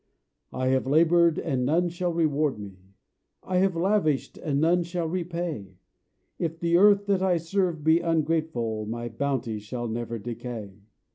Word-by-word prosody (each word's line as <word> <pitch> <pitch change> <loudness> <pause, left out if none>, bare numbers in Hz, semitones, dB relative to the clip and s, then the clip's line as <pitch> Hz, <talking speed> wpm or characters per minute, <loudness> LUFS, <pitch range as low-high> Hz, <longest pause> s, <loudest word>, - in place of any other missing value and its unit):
I 130 0 -1
have 130 0 +1
laboured 165 +3 +4
and 135 -6 -1
none 170 +7 +2
shall 175 +1 -2
reward 155 -4 +1
me, 95 -1 -12 0.5
I 185 - -1
have 190 -1 +2
lavished 170 -5 +1
and 140 -3 -2
none 170 +3 +3
shall 170 0 -3
repay, 170 - -4 0.6
If 165 -1 -3
the 170 0 +1
earth 200 +2 +5
that 200 -2 +1
I 185 -2 +2
serve 165 -1 -1
be 160 +2 +4
ungrateful 155 -10 -1
My 120 +1 -4
bounty 115 -2 -2
shall 120 +3 -5
never 115 +1 -4
decay. 110 -3 -7
160 Hz, 150 wpm, -26 LUFS, 120-170 Hz, 0.6 s, earth